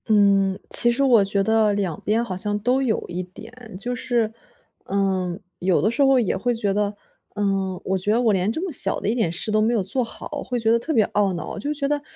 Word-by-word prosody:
嗯， 200 -3 +3
其 240 - +5
实 260 +4 +1
我 240 -6 +5
觉 195 0 0
得 220 -1 +2
两 195 -6 -2
边 220 +3 +1
好 185 - -5
像 205 +3 -2
都 250 +5 +1
有 245 -5 0
一 175 +1 -4
点。 220 +4 -11
就 245 +4 -3
是， 235 -3 -1 0.5
嗯， 190 -2 -1 0.2
有 180 0 +2
的 215 - +2
时 235 - -1
候 270 -1 +5
也 225 - 0
会 240 +5 -1
觉 205 -3 -1
得， 205 0 -1 0.4
嗯， 195 -3 -1
我 190 0 0
觉 190 +3 -1
得 225 - +3
我 230 -4 +3
连 190 +2 +1
这 320 +9 -4
么 370 - -4
小 195 -8 +3
的 - - -4
一 215 - +2
点 220 -9 0
事 175 +5 -3
都 215 0 +2
没 225 +2 +2
有 215 -5 +1
做 250 +7 -1
好， 230 - -8 0.2
会 250 -1 -3
觉 225 -1 +2
得 235 - +3
特 300 - -4
别 225 -8 +3
懊 200 -2 +1
恼， 170 +3 -6
就 285 +8 -3
觉 285 -1 -2
得， 290 0 -1
210 Hz, 260 characters per minute, -22 LUFS, 195-240 Hz, 0.5 s, 其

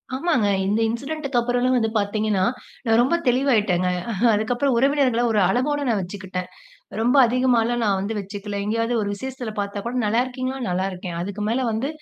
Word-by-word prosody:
ஆமாங்க. 270 -7 +1 0.2
இந்த 210 +3 +1
இன்சிடென்ட்டுக்கு 275 +3 -3
அப்பறன்லாம் 245 +1 +1
வந்து 225 -2 +1
பார்த்தீங்கன்னா, 210 -1 0 0.4
நான் 225 0 +3
ரொம்ப 260 +7 +2
தெளிவாயிட்டேங்க. 215 -9 +2 0.2
அ - - -2 0.2
அதுக்கப்புறம் 245 +6 +1
உறவினர்கள 270 -2 +2
ஒரு 215 - +2
அளவோட 290 +4 +1
நான் 220 -3 +1
வச்சுக்கிட்டேன். 185 -1 -6 0.5
ரொம்ப 245 +5 +3
அதிகமாகலாம் 240 -1 +1
நான் 200 -2 +2
வந்து 205 +3 -3
வச்சுக்கல. 200 +1 -5
எங்கேயாவது 230 +3 0
ஒரு 205 - -2
விஷேசத்தில 250 +1 -6
பார்த்தா 200 0 -4
கூட, 240 - -3
நல்லாருக்கீங்ளா? 255 +4 -1
நல்லாருக்கேன். 180 -1 -3
அதுக்கு 200 +3 -4
மேல 250 +4 0
வந்து 225 +5 -1
230 Hz, 155 wpm, -23 LUFS, 205-255 Hz, 0.5 s, நான்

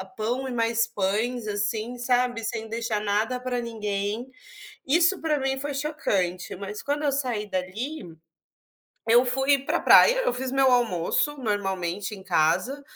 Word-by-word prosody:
pão 245 +5 -2
e - - -4
mais 230 -1 +1
pães 225 +2 -1
assim, 215 +3 -2
sabe, 245 -1 0
sem 225 0 -4
deixar 225 -1 -2
nada 215 +5 0
pra 250 -1 -2
ninguém. 215 0 -3 0.6
Isso 345 +7 +3
pra 310 -2 0
mim 270 0 -1
foi 285 +1 -4
chocante, 190 - -2
mas 200 +2 -7
quando 290 +1 -2
eu 285 - +2
saí 250 -6 -1
dali, 190 - -5 0.9
eu 235 +2 +5
fui 270 +3 +2
pra 270 - -1
a - - -1
praia, - - +7
eu - - +1
fiz 255 +1 -4
meu 270 -1 +3
almoço 240 - +1
normalmente 195 -5 -2
em 195 - -11
casa, 185 - +1
235 Hz, 155 wpm, -25 LUFS, 205-265 Hz, 0.9 s, praia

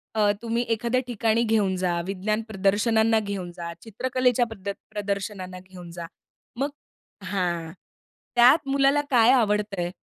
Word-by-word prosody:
अ, 210 -1 +4
तुम्ही 235 +1 -1
एखाद्या 235 +3 +1
ठिकाणी 230 -1 +1
घेऊन 215 -4 +1
जा, 180 -2 0
विज्ञान 205 +3 -1
प्रदर्शनांना 220 +2 +2
घेऊन 200 -4 -5
जा, 170 -1 -6
चित्रकलेच्या 250 +2 0
प्रद 200 -3 -7 0.2
प्रदर्शनांना 200 -2 -4
घेऊन 180 -2 -12
जा. 170 0 -7 0.5
मग 280 +2 0 0.6
हां, 175 -4 -2 0.6
त्यात 260 +5 +6
मुलाला 275 +1 +3
काय 240 -1 +6
आवडतंय? 210 -6 +1
210 Hz, 125 wpm, -25 LUFS, 185-235 Hz, 0.6 s, त्यात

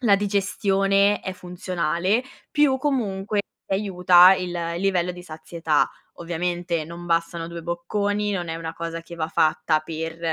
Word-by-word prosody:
la 200 -3 +6
digestione 200 0 +2
è 190 - -4
funzionale, 180 +3 -1 0.3
più 295 -3 +4
comunque 210 -7 -1 0.3
aiuta 185 -2 +6
il 180 -1 -3 0.3
il - - -4
livello 180 -2 +1
di 180 0 -10
sazietà. 160 -1 -1 0.3
Ovviamente 175 -1 -2
non 170 +2 -9
bastano 165 0 -1
2 170 -1 -7
bocconi, 205 +5 -1
non 175 -3 -3
è 165 - -3
una 165 0 -6
cosa 165 0 -5
che 170 +1 -11
va 160 -1 -3
fatta 155 0 +2
per, 160 +1 -5
180 Hz, 145 wpm, -24 LUFS, 165-195 Hz, 0.3 s, la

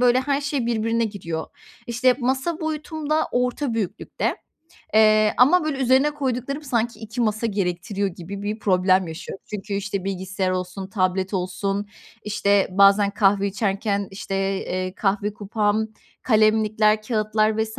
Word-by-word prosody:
böyle, 250 +1 +4
her 280 +1 0
şey 280 -4 -2
birbirine 230 0 +1
giriyor. 170 -7 -4 0.4
İşte, 245 +2 +3
masa 265 +7 -1
boyutum 315 -1 -4
da 315 +1 +2
orta 250 +1 0
büyüklükte, 205 -3 -2 0.6
eee, 215 -1 +5
ama, 310 +7 +5
böyle, 295 -3 -2
üzerine 265 +3 +3
koyduklarım 275 0 -3
sanki 240 -3 -1
2 220 +2 -5
masa 220 0 +1
gerektiriyor 195 0 -1
gibi 190 +3 -8
bir 210 +2 -3
problem 185 -3 +2
yaşıyorum. 160 +4 -8
Çünkü, 205 -1 -5
işte, 200 -1 -3
bilgisayar 190 0 -2
olsun, 185 +1 -3
tablet 185 0 0
olsun, 195 +2 -2 0.4
işte, 200 -2 +2
bazen 200 +1 +5
kahve 200 -1 +2
içerken, 200 0 -1
işte, 195 0 -6 0.3
eee, 185 0 -3
kahve 205 +1 0
kupam, 210 +1 0 0.4
kalemlikler, 215 -1 +3
kâğıtlar 215 -1 +1
vs. 220 0 -6
215 Hz, 140 wpm, -23 LUFS, 195-240 Hz, 0.6 s, eee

